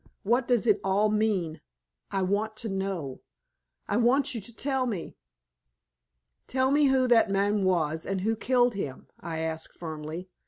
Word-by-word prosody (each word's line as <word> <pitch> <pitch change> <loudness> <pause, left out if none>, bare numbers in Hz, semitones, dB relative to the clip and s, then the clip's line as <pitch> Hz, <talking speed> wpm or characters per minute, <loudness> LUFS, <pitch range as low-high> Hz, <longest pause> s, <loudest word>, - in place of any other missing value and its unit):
What 240 +4 +2
does 245 -2 +2
it 210 -3 +4
all 200 +2 +2
mean? 200 -8 0 0.5
I 195 -1 -1
want 210 +3 0
to 220 +1 -4
know. 190 -8 -3 0.7
I 205 - 0
want 250 +4 +3
you 230 - -4
to 200 - -9
tell 265 -1 0
me." 200 -8 -4 1.3
"Tell 260 +1 +1
me 295 +1 +4
who 265 -2 +3
that 230 -3 +5
man 200 +1 +1
was, 160 -4 +1
and 195 -1 -1
who 220 +3 +1
killed 245 +1 +2
him?" 145 -10 -5
I 165 -2 -5
asked, 160 0 -4
firmly. 160 +2 -6
205 Hz, 160 wpm, -28 LUFS, 175-240 Hz, 1.3 s, that